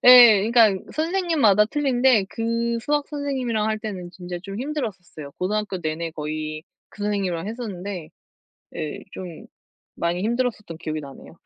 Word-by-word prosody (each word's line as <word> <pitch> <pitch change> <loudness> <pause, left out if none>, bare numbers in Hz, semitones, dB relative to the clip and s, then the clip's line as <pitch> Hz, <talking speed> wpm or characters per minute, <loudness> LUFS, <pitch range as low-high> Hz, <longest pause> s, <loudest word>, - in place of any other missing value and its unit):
예, 240 -5 +10
그니까 230 -3 +7 0.2
선생님마다 315 - +3
틀린데 255 -4 +3
그 230 +1 -1
수학 290 +3 0
선생님이랑 260 -7 -1
할 215 0 0
때는 190 -5 -6
진짜 180 -1 -7
좀 200 +1 -6
힘들었었어요. 195 - -5
고등학교 205 0 -2
내내 165 +1 -2
거의 155 0 -4 0.3
그 205 - -9
선생님이랑 195 -3 -1
했었는데 200 -7 -5 0.7
예 155 -2 -4
좀 180 -3 -8 0.5
많이 170 +2 -1
힘들었었던 225 -6 -1
기억이 155 -2 -4
나네요. 140 +2 -11
210 Hz, 340 characters per minute, -24 LUFS, 175-245 Hz, 0.7 s, 예